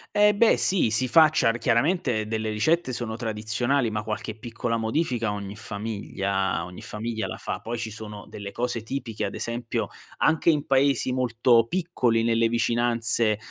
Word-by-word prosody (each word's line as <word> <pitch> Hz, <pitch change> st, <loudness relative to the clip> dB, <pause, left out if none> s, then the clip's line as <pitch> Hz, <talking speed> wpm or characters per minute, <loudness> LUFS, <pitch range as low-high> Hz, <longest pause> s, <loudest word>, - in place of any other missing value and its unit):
Eh 210 Hz, 0 st, +6 dB
beh 220 Hz, +2 st, +4 dB
sì, 185 Hz, -11 st, +2 dB
si 120 Hz, +4 st, +1 dB
facciar 145 Hz, -5 st, +4 dB
chiaramente 125 Hz, -, +1 dB
delle 110 Hz, 0 st, -2 dB
ricette 145 Hz, +7 st, +1 dB
sono 115 Hz, -2 st, -3 dB
tradizionalim 115 Hz, +2 st, -1 dB
ma 105 Hz, -, -1 dB
qualche 110 Hz, 0 st, -4 dB
piccola 115 Hz, +1 st, -3 dB
modifica 115 Hz, 0 st, 0 dB
ogni 100 Hz, -1 st, -5 dB
famiglia 100 Hz, -4 st, -2 dB
ogni 90 Hz, 0 st, -10 dB
famiglia 110 Hz, +1 st, -4 dB
la -, -, -6 dB
fa. -, -, -4 dB
Poi 120 Hz, +1 st, -5 dB
ci 115 Hz, -1 st, -4 dB
sono 105 Hz, -1 st, -8 dB
delle 100 Hz, -1 st, -7 dB
cose 120 Hz, 0 st, -2 dB
tipiche, 115 Hz, -1 st, -4 dB
ad -, -, -5 dB
esempio 115 Hz, 0 st, -3 dB, 0.3 s
anche 160 Hz, +1 st, +3 dB
in 150 Hz, -3 st, +2 dB
paesi 135 Hz, -1 st, +2 dB
molto 120 Hz, -2 st, +3 dB
piccoli 130 Hz, -10 st, +1 dB
nelle 115 Hz, 0 st, +3 dB
vicinanze 115 Hz, -2 st, +1 dB
115 Hz, 155 wpm, -25 LUFS, 110-130 Hz, 0.3 s, Eh